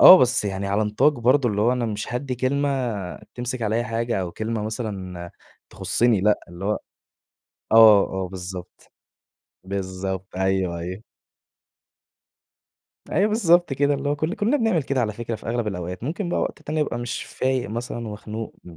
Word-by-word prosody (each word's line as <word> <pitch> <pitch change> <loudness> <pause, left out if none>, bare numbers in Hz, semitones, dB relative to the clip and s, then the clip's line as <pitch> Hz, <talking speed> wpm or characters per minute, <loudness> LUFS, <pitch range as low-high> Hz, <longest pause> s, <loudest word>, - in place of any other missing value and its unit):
آه. 185 - +11
بس 125 -2 +3
يعني 100 -1 -2
على 100 +2 +1
نطاق 105 +8 +3
برضه 125 +1 +3
اللي 105 -1 -1
هو 120 +3 +4
أنا 125 -2 -1
مش 110 +3 -4
هادّي 125 +1 -2
كلمة 140 +3 0 0.7
تمسِك 125 0 -3
عليّا 110 +2 +1
حاجة 115 -1 -1
أو 90 -2 -4
كلمة 110 0 -3
مثلًا 95 -6 -5 0.4
تخُصِّني 120 -4 +2
لأ 105 +2 +3
اللي 85 +2 -8
هو 105 +1 +1 0.9
آه، 110 -3 +9 0.2
آه - - -5
بالضبط. 90 -1 -8 0.7
بالضبط. 95 -1 -4
أيوه، 95 -2 0
أيوه. 90 +5 -6 2.1
أيوه 205 +3 +3
بالضبط 175 -8 +3
كده. 145 +2 +2
اللي 140 +1 -2
هو 145 - +1
كل 155 +6 -1
كُلّنا 225 +7 +1
بنعمل 225 - +2
كده 135 -1 0
على 110 -3 0
فكرة 115 +1 -4
في - - -9
أغلب 120 -1 -1
الأوقات. 90 -2 -4
ممكن 175 +6 -3
بقى - - 0
وقت - - -3
تاني 155 +1 -2
أبقى 145 - -1
مش 120 0 -3
فايق 130 -4 -1
مثلًا 120 +3 -4
ومخنوق 110 +1 -6
م 85 -2 -12
115 Hz, 165 wpm, -24 LUFS, 95-130 Hz, 2.1 s, آه